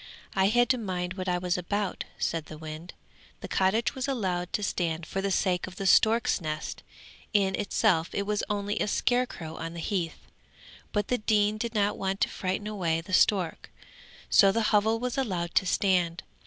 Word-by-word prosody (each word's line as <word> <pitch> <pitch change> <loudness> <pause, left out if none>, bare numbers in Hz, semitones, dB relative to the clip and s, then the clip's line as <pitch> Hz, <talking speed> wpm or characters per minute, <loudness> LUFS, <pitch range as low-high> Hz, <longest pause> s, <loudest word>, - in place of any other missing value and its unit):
I 190 - +3
had 240 +4 +4
to 255 - +3
mind 180 -4 -3
what 185 -1 -4
I 180 - +1
was 180 0 -1
about,' 200 +2 -2
said 165 -2 -2
the 155 - -9
wind. 155 +2 -8 0.5
'The - - -6
cottage 195 +5 +2
was 260 +1 -3
allowed 185 -9 -1
to 210 - -1
stand 170 -4 -1
for 195 +4 -3
the 200 - -1
sake 185 -1 +1
of 185 - -10
the 195 - -5
stork's 220 +2 +4
nest; 155 -1 -4 0.5
in 195 -2 +3
itself 195 -4 +1
it 200 - -1
was 210 0 -1
only 205 0 -1
a - - 0
scarecrow 210 -9 -1
on 165 +1 -5
the - - -6
heath, 170 -2 -3 0.7
but 210 -1 -1
the 250 - +1
dean 210 0 +2
did 235 0 -3
not 205 -1 +1
want 195 0 -1
to - - +3
frighten 190 +2 -3
away 180 -6 -1
the 180 +3 -9
stork, 185 -3 +2 0.6
so 195 -1 +6
the 220 +1 +1
hovel 220 +2 +3
was 250 +3 -2
allowed 180 -9 -2
to 190 - +2
stand. 180 -3 +1
195 Hz, 190 wpm, -28 LUFS, 175-210 Hz, 0.7 s, so